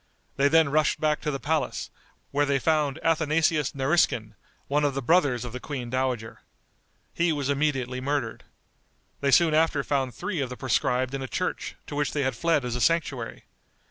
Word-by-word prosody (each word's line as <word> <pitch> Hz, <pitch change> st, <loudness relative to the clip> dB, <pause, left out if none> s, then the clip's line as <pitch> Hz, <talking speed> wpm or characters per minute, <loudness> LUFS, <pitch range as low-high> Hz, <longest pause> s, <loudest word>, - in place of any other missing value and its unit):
They 140 Hz, +1 st, +3 dB
then 160 Hz, 0 st, +4 dB
rushed 155 Hz, +1 st, +2 dB
back 155 Hz, 0 st, +1 dB
to 155 Hz, -, -2 dB
the 135 Hz, -2 st, -2 dB
palace, 155 Hz, +1 st, -2 dB, 0.4 s
where 145 Hz, +1 st, +1 dB
they 140 Hz, -1 st, +2 dB
found 150 Hz, 0 st, +1 dB
Athanasius 155 Hz, -2 st, +2 dB
Nariskin, 135 Hz, -6 st, +1 dB, 0.3 s
one 145 Hz, +1 st, +1 dB
of 145 Hz, -2 st, +1 dB
the 135 Hz, -, -1 dB
brothers 135 Hz, -5 st, +2 dB
of 120 Hz, -, -7 dB
the 125 Hz, -, -5 dB
queen 125 Hz, -4 st, -5 dB
dowager. 130 Hz, -4 st, -2 dB, 0.7 s
He 170 Hz, 0 st, +1 dB
was 145 Hz, -2 st, -1 dB
immediately 135 Hz, -3 st, -1 dB
murdered. 140 Hz, -4 st, -2 dB, 0.8 s
They 140 Hz, -, 0 dB
soon 160 Hz, +3 st, +5 dB
after 155 Hz, -2 st, +2 dB
found 135 Hz, -4 st, -1 dB
three 185 Hz, -, -3 dB
of 130 Hz, -, -2 dB
the 125 Hz, -, -7 dB
proscribed 130 Hz, +1 st, 0 dB
in 135 Hz, -, -3 dB
a 130 Hz, -, -4 dB
church, 180 Hz, +7 st, -3 dB
to 145 Hz, -, -7 dB
which 145 Hz, -2 st, -1 dB
they 145 Hz, -, 0 dB
had 130 Hz, -2 st, -1 dB
fled 165 Hz, 0 st, +1 dB
as 120 Hz, -1 st, -2 dB
a 125 Hz, -, -3 dB
sanctuary. 145 Hz, -8 st, 0 dB
140 Hz, 185 wpm, -26 LUFS, 130-155 Hz, 0.8 s, soon